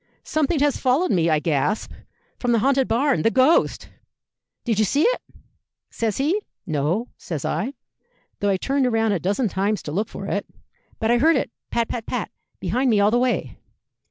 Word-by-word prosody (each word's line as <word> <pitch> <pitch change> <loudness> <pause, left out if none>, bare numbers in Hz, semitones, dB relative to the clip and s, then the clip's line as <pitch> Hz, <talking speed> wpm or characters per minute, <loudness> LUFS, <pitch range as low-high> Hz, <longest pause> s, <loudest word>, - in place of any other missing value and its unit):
'Something 310 +1 0
has 290 -1 +2
followed 275 +8 +2
me,' 170 -3 +2
I 155 - +3
gasped, 155 +6 -1 0.5
'from 245 -1 +1
the - - +4
haunted 270 +3 +2
barn 265 +4 +2
the 225 - +3
ghost!' 260 +7 +2 0.7
'Did 225 -4 0
you 215 - +4
see 285 - +2
it?' - - +2 0.7
says 220 -3 -2
he. 320 +10 +1 0.2
'No,' 165 - -1
says 155 -5 -5
I, 260 +6 -2 0.6
'though 205 - +1
I 195 - +2
turned 270 +4 +1
round 225 -2 +2
a 190 - 0
dozen 205 - 0
times 200 +2 -1
to 150 - -5
look 205 +7 -1
for 195 - -7
it. 200 +1 -2 0.5
But 225 +1 0
I 240 - +4
heard 320 +5 +5
it 265 - -1 0.2
pat, 235 -1 0
pat, 230 -2 -5
pat, 245 -4 -3 0.3
behind 245 +9 0
me 215 -3 +3
all 205 +1 +4
the 240 - +3
way.' 250 0 -1
230 Hz, 185 wpm, -23 LUFS, 200-265 Hz, 0.7 s, heard